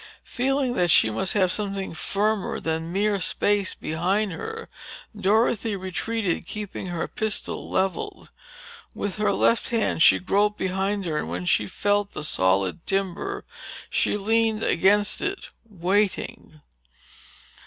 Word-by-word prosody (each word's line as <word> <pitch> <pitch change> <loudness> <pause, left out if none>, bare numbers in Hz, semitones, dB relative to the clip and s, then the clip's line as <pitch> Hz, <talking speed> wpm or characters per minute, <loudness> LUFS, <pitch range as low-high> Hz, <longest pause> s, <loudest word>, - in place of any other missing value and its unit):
Feeling 265 0 0
that 180 -6 +1
she 110 - +5
must 110 - 0
have 185 -3 +3
something 195 -3 -2
firmer 205 +5 -1
than 160 +1 -2
mere 200 +2 +1
space 200 +2 +1
behind 185 +6 -1
her, 450 - -6 0.5
Dorothy 210 +1 +1
retreated, 190 0 -2
keeping 205 -1 -6
her 175 -2 -3
pistol 220 -2 -2
leveled. 190 0 -2 0.6
With 205 0 -3
her 210 -1 +2
left 230 +3 +2
hand 230 -8 0
she - - +7
groped 205 +3 +1
behind 195 +1 -1
her 155 -3 -1
and - - -4
when 90 +2 -4
she 105 +3 +2
felt 205 - 0
the 155 - -5
solid 95 - +1
timber, 195 -2 -2 0.5
she - - +1
leaned 220 +1 +1
back - - +1
against 205 +4 +3
it, 395 -1 -3 0.2
waiting. 190 -4 -1
195 Hz, 130 wpm, -25 LUFS, 175-210 Hz, 0.6 s, she